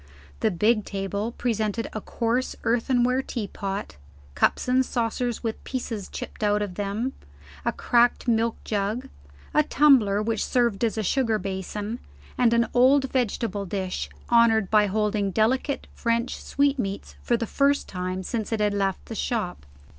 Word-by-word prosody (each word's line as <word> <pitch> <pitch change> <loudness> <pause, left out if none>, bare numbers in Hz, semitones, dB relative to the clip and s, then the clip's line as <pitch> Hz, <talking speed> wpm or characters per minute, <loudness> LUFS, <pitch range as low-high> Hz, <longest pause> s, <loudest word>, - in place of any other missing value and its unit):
The 220 - +2
big 210 +4 +2
table 200 +3 -3
presented 225 -2 -1
a 215 - -4
coarse 235 +5 -1
earthenware 245 +2 +2
teapot; 200 - -5 0.4
cups - - +1
and 255 +1 +4
saucers 240 0 -2
with 225 -1 -3
pieces 230 -6 -4
chipped - - -7
out 210 0 +2
of 200 -3 -5
them; 205 +7 -2 0.5
a - - +1
cracked 240 +1 +2
milk 230 -1 +2
jug; 215 +5 -2 0.4
a 305 - +5
tumbler 265 -9 +4
which 220 -1 0
served 235 -4 +1
as 225 -1 +1
a 220 - 0
sugar 225 0 +1
basin; 205 +4 -4 0.4
and 245 -2 +3
an 235 0 +3
old 265 +2 +4
vegetable 220 -5 -1
dish, 185 -1 -3 0.2
honored 225 -4 +4
by 210 -1 +5
holding 210 0 0
delicate 250 - +1
French 235 +1 -1
sweet 280 -1 +1
meats 195 -3 -4
for 240 - +1
the 230 - -2
first 280 +5 +1
time 185 0 -4
since 220 +3 -3
it 225 - 0
had 210 -1 +2
left 195 -2 -1
the - - -7
shop. 210 - -3
225 Hz, 155 wpm, -25 LUFS, 205-245 Hz, 0.5 s, a